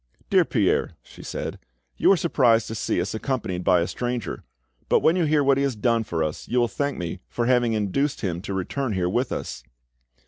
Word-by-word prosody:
"Dear - - +5
Pierre," - - +1
she - - -14
said, - - -5 0.4
"you - - +4
are 195 - +5
surprised 120 -9 +3
to - - -4
see 110 - -1
us 90 +2 -2
accompanied 110 -6 -2
by 90 -2 +4
a 85 - 0
stranger, 120 -2 -3 0.5
but - - +4
when 160 - +4
you 180 -3 +2
hear 150 -1 +3
what 135 -1 +4
he - - +1
has 135 -4 0
done 115 +1 +1
for 85 -6 -2
us 75 0 -4
you 125 - +1
will 120 - +3
thank 140 +4 -2
me 85 +1 -4
for 120 - -1
having 120 -2 +3
induced 110 +7 0
him 90 -4 -2
to 100 0 -5
return 115 +6 -2
here 90 -2 0
with 120 +7 0
us." 65 - -4
115 Hz, 215 wpm, -24 LUFS, 95-135 Hz, 0.5 s, Dear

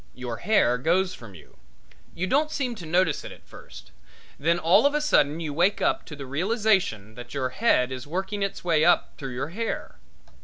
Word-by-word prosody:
Your 125 -2 -5
hair 125 - +2
goes 180 +6 +1
from 105 -5 -12
you. 80 - -17 0.6
You 180 - -2
don't 290 +10 +1
seem 270 -5 -2
to 180 -8 -9
notice 175 -2 +1
it - - -8
at - - -15
first; - - -14 0.5
then 165 +4 +2
all 180 - +4
of 290 - -1
a - - +2
sudden 160 - +2
you 155 -3 -4
wake 180 +6 +2
up - - 0
to 150 - -8
the 140 -1 -8
realization 180 - 0
that 120 +3 -10
your 130 -2 -1
head 130 - +2
is 130 +1 -6
working 190 +5 -3
its 195 0 -3
way 165 -3 +2
up 175 +1 +3
through 130 -3 -5
the 145 - -3
hair. 225 +5 -4
165 Hz, 200 wpm, -25 LUFS, 130-195 Hz, 0.6 s, all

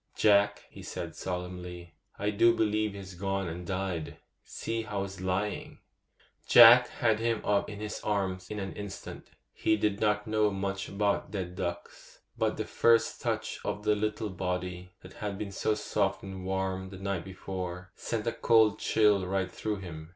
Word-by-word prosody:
'Jack,' 100 -1 +4
he - - -11
said - - -6
solemnly, 90 -1 -6 0.2
'I 105 +1 0
do 115 +3 +4
believe 110 -2 +1
he's 95 -1 -8
gone 95 +1 -2
and 85 +1 -6
died! 95 -4 -3 0.3
See 115 0 -3
how 105 -3 -3
he's 95 -1 -7
lying.' 95 +3 -2 0.7
Jack - - +10
had 110 -2 +1
him 115 -1 +1
up 100 -1 +2
in 105 -1 -7
his 105 0 -4
arms 95 -3 -1
in 105 - -4
an 95 -1 -4
instant. 100 -1 -8 0.3
He 110 - +2
did 105 -1 0
not 105 -1 +1
know 110 -1 +2
much 100 0 -3
about 100 0 0
dead 90 -3 -4
ducks, 90 -1 -6 0.2
but - - 0
the - - -2
first 115 -1 +3
touch - - -2
of 105 - -3
the 105 0 +3
little 105 0 -2
body, 90 0 -3
that - - -12
had 105 -2 -4
been 105 -1 -5
so 105 +2 0
soft 105 -2 -1
and 95 -1 -7
warm 95 0 -2
the 95 - -9
night 100 -2 -2
before, 90 -1 -6
sent 115 -2 -3
a 115 - +1
cold 110 -2 +4
chill 105 -4 +3
right 95 -1 -1
through 105 -2 -3
him. 80 -3 -8
100 Hz, 175 wpm, -30 LUFS, 95-105 Hz, 0.7 s, Jack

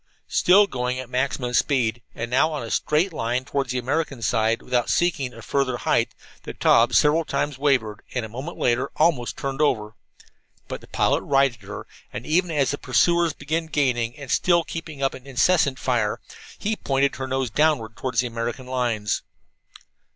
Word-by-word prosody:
Still 195 +3 +6
going 125 -7 -2
at 130 -1 -7
maximum 125 -1 -1
speed, 120 -3 +1
and 115 +1 -5
now 140 +5 +3
on 150 -5 -4
a 115 - -6
straight 165 +5 +1
line 125 -1 -1
toward 140 -2 -2
the 125 - -1
American 135 0 -2
side, 115 0 +1
without 125 -2 0
seeking 155 -7 +1
a 115 -1 -12
further 130 -1 0
height, - - 0 0.3
the - - -8
Taube - - +4
several 150 +3 +4
times 145 -3 -2
wavered, 125 -7 +1
and, 125 -3 -1
a - - -6
moment 130 +10 -7
later, 125 +3 +1
almost 155 -7 +1
turned 135 +1 -3
over. 110 -7 +1 0.7
But - - -6
the - - -15
pilot - - +1
righted 135 -4 +2
her, 100 +1 -8 0.3
and 120 - -6
even 175 +3 +2
as 145 -5 +1
the 145 - -4
pursuers 170 +5 +2
began 155 +3 -3
gaining, 125 -6 0
and 140 -3 -7
still 170 -2 +3
kept 165 0 -6
up 140 -3 -2
an 130 +1 -11
incessant 135 +1 +2
fire, 120 -5 0 0.4
he 220 +2 -1
pointed 135 -6 0
her 130 - -4
nose 130 -3 -1
downward 135 -6 +1
toward 130 -1 -4
the 125 - +3
American 120 +2 -4
lines. 120 -5 -1
130 Hz, 180 wpm, -23 LUFS, 120-150 Hz, 0.7 s, Still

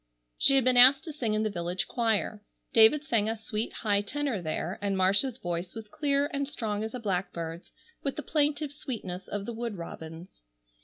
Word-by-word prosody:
She 275 - +4
had 270 - +5
been 250 0 +3
asked 260 +3 +9
to 315 - -7
sing 230 -7 -1
in 215 - 0
the 215 - -1
village 175 0 -3
choir. 220 -3 0 0.3
David 230 +7 +6
sang 225 -7 +1
a 225 - -2
sweet 220 0 -4
high 205 -3 0
tenor 265 0 -3
there, 160 +2 -3
and 200 -1 -1
Marcia's 200 +7 +2
voice 175 -2 -4
was 225 -1 -8
clear 285 +2 0
and 280 0 -1
strong 215 -7 -3
as 220 +2 -5
a - - -4
blackbird's, 180 -5 -4 0.3
with 275 - -3
the 300 - -5
plaintive 295 0 0
sweetness 205 -10 -6
of 205 -1 -4
the 235 - -5
wood 230 -1 -4
robin's. 165 - -10
220 Hz, 195 wpm, -28 LUFS, 190-270 Hz, 0.3 s, asked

